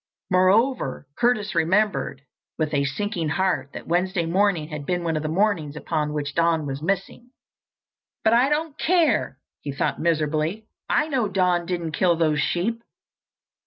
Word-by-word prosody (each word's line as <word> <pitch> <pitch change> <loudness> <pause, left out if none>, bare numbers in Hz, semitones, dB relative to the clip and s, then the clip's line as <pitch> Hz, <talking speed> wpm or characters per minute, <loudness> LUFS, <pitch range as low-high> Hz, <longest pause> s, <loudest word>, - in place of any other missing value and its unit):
Moreover, 185 - +2
Curtis 235 -4 +1
remembered 175 -4 +1 0.3
with 155 -1 -1
a 140 -1 +2
sinking 170 +3 -2
heart 185 -4 0
that - - -8
Wednesday 175 +1 0
morning 175 -2 +1
had 150 -2 -5
been 175 +3 -1
one 165 -1 -1
of 155 - -1
the 155 - -3
mornings 165 -5 0
upon 150 -1 -2
which 145 -1 -3
Don 165 -1 +2
was 135 0 -4
missing. 195 +7 -3 0.9
"But 220 - +4
I 245 +4 +4
don't 300 0 -1
care!" 315 - +2 0.2
he 145 - -4
thought 140 - -2
miserably. 160 +5 0 0.2
"I 300 - +2
know 260 -8 0
Don 180 -3 +1
didn't 170 -3 -2
kill 175 +2 +2
those 155 -2 +1
sheep." 215 +10 -1
175 Hz, 155 wpm, -24 LUFS, 155-210 Hz, 0.9 s, But